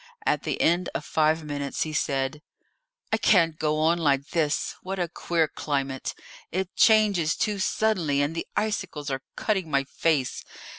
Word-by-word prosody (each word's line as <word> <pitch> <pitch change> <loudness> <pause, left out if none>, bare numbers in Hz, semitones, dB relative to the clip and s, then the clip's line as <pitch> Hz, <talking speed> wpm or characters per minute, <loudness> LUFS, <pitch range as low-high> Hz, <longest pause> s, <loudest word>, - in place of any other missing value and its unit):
At - - +2
the - - -3
end 175 +2 +2
of - - -3
five 155 +1 +2
minutes 145 -2 -2
he 155 - -5
said: 135 -1 -1 0.7
"I - - +4
can't 165 -7 +3
go 155 -1 +1
on 165 +2 +2
like 140 -3 +1
this! 155 -4 0
What 190 +1 -4
a 175 -2 0
queer 165 -1 0
climate! 135 -3 -3 0.4
It 190 -1 -3
changes 210 -8 +4
too 210 -2 -1
suddenly, 190 -8 +1
and 145 +2 +1
the 165 - -4
icicles 160 -9 -2
are 135 0 -2
cutting 190 -6 -1
my 140 -2 +2
face. 140 -1 0
160 Hz, 160 wpm, -26 LUFS, 145-185 Hz, 0.7 s, I